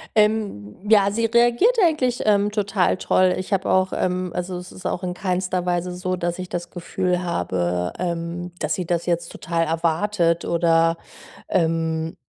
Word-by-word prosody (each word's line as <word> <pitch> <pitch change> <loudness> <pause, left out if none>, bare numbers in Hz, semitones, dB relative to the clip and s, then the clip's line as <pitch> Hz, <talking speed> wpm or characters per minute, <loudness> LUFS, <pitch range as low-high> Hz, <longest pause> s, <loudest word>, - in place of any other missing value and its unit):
Ähm, 210 - +1
ja, 200 -2 +5
sie 230 +2 0
reagiert 240 - +3
eigentlich, 260 -7 +1
ähm, 205 -1 +3
total 200 -3 +1
toll. 185 0 +2
Ich 185 +2 -4
habe 195 0 0
auch, 185 0 +2
ähm 180 -1 -1
also, 180 0 -3
es 180 0 -9
ist 185 - -13
auch 180 - -2
in 180 -1 -2
keiner 185 -1 -1
Weise 180 0 -1
so, 185 0 -2
dass 175 0 -3
ich 185 -1 -5
das 175 0 -4
Gefühl 180 +1 -2
habe, 90 - -1
ähm, 175 0 -3
dass 155 -1 -1
sie 180 - -3
das 170 0 -1
jetzt 170 -1 -1
total 165 -1 -1
erwartet 170 +2 +1
oder, 165 -1 +2 0.5
ähm, 165 -2 0
180 Hz, 165 wpm, -22 LUFS, 170-195 Hz, 0.5 s, ja